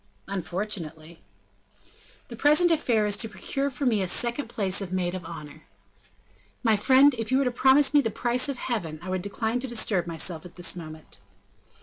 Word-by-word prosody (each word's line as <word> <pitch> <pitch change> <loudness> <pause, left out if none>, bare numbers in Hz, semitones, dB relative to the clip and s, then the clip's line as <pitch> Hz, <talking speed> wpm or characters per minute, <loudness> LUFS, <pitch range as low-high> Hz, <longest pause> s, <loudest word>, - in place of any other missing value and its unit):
"Unfortunately." 175 -4 -5 1.1
"The 235 - -7
present 300 +8 +4
affair 240 -9 +2
is 205 -1 +1
to 225 +1 0
procure 275 +7 -3
for 275 +1 -4
me 220 -5 +2
a 190 - -1
second 240 +8 +1
place 200 -4 +1
of 190 -2 -6
maid 180 -1 -1
of 185 -1 -5
honor." 150 -3 -10 1.0
"My 225 -3 +4
friend, 265 +6 +5
if 225 +2 -3
you 260 - +4
were 275 - +2
to 250 - +1
promise 265 +4 +4
me 290 - +6
the 225 - -1
price 245 +5 0
of 275 - -3
heaven, 175 -12 -3
I 185 - -7
would 185 -1 -2
decline 220 +4 -2
to 265 - -3
disturb 215 -7 0
myself 165 0 -3
at 180 - -13
this 175 0 -1
moment." 155 -2 -10
210 Hz, 190 wpm, -26 LUFS, 180-250 Hz, 1.1 s, me